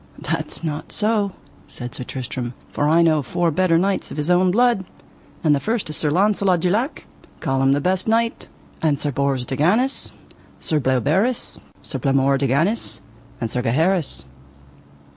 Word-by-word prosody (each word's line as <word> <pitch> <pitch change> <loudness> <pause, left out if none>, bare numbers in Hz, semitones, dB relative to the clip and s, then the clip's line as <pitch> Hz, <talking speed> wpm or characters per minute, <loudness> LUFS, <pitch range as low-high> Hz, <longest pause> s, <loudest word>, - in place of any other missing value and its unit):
That - - -2
is - - -9
not 155 -2 -4
so, 210 -2 +1 0.3
said 125 -1 -7
Sir - - -5
Tristram, 125 -1 -5 0.2
for 145 - +1
I 165 +2 +5
know 155 -2 +3
four 165 +6 0
better 165 +1 +3
knights 195 +3 0
of - - -8
his 150 +4 0
own 180 +1 +4
blood, 235 0 +3 0.6
and 155 -3 +4
the 145 - +2
first 220 -2 -2
is 150 - -2
Sir 150 - +1
Launcelot 190 +1 +2
du 180 - +2
Lake, 240 - -1 0.3
call 135 0 0
him 135 0 +4
the 140 - +2
best 185 +5 0
knight, 230 +1 +1 0.3
and 150 -3 +2
Sir 145 +1 -2
Bors 135 -2 0
de 130 - -3
Ganis, 215 - +2 0.5
Sir 155 - 0
Bleoberis, 150 - +1 0.2
Sir - - -4
Blamore 135 0 +2
de 140 - +1
Ganis, 165 - 0 0.4
and 115 -2 -3
Sir 125 - -1
Gaheris. 155 - 0
160 Hz, 175 wpm, -21 LUFS, 135-195 Hz, 0.6 s, I